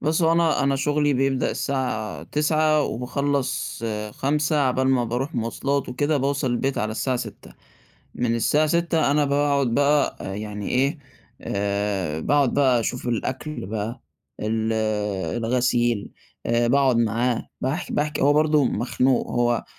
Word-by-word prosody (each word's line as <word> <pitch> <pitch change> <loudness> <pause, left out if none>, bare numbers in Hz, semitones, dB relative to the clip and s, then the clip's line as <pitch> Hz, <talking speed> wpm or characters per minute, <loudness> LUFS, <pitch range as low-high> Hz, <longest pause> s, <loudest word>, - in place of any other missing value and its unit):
بُصّ، 160 +3 +1
هو 165 0 +4
أنا 165 -3 +2
أنا 140 0 +2
شُغلي 145 +1 +1
بيبدأ 135 0 +1
الساعة 110 - -2
09:00، 155 - +2
وباخلَّص 135 0 -2 0.3
17:00، 150 +5 0
على 130 -2 +2
بال 130 0 +2
ما 125 -2 +2
باروح 125 +6 -3
مواصلات 130 +4 -1
وكده، 145 +4 0
باوصل 140 0 0
البيت 130 +3 -1
على 110 0 -1
الساعة 130 +3 -1
18:00 - - -8 0.6
من 115 -1 0
الساعة 150 +7 +2
18:00 165 -3 +1
أنا 150 0 +3
باقعد 140 -1 +2
بقى 145 +4 +2 0.3
يعني 105 -1 -5
إيه، 140 +5 +1 0.4
آآ، 100 -5 -2
باقعد 140 - +2
بقى 130 -4 +3
أشوف 125 +2 -3
الأكل 130 +2 -3
بقى، 110 +4 -4 0.4
ال 110 +1 -1 0.7
الغسيل، 120 -3 +1 0.3
آآ 120 0 +2
باقعد 135 -1 +3
معاه، 115 +1 0
باحكي 135 +6 -2
باحكي، 150 0 -1
هو 145 +2 +5
برضه 150 -1 +3
مخنوق، 125 +3 +1
هو 120 -2 +1
130 Hz, 140 wpm, -23 LUFS, 115-145 Hz, 0.7 s, هو